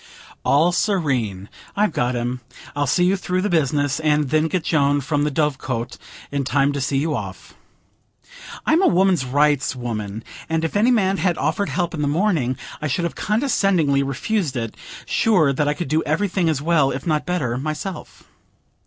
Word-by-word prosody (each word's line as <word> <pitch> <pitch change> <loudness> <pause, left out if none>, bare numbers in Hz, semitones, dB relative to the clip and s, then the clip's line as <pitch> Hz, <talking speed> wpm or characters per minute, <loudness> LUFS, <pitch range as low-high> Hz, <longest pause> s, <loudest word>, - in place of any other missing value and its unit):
"All 160 +5 +3
serene. 130 - 0 0.3
I've 210 -2 +2
got 125 -3 0
him. 120 +1 -3 0.3
I'll 145 0 0
see 180 - +2
you 185 +2 +3
through 185 -1 -2
the 210 - -1
business, 145 -3 +1
and 150 -3 +1
then 155 +1 +3
get 170 +1 -1
Joan 145 -2 +2
from 145 +1 0
the - - +1
Dove 150 -2 0
Cote 120 -1 -4 0.3
in 140 -1 -1
time 140 +2 +1
to 140 - -3
see 135 +1 0
you 155 +3 0
off." - - -7 1.1
I'm 320 +3 +3
a - - +5
woman's 180 -5 +3
rights 145 +1 +2
woman, 110 -3 -5 0.3
and 160 0 0
if 165 - -4
any 215 +4 +4
man 195 -5 +2
had 180 -3 0
offered 160 +7 -1
help 175 -1 -1
in 155 - -3
the 145 - +1
morning, 150 - +1 0.2
I 155 - -1
should 160 +5 -1
have 170 - -2
condescendingly 195 - +1
refused 140 - -1
it, 115 -2 -3 0.3
sure 175 -11 +3
that 145 +2 0
I 145 - +1
could 175 - -4
do 155 +3 +1
everything 190 -4 0
as 145 -3 -1
well, 155 -4 +3
if 135 0 -4
not 155 -1 0
better, 150 -10 -1
myself. 155 +4 -5
150 Hz, 185 wpm, -21 LUFS, 135-180 Hz, 1.1 s, a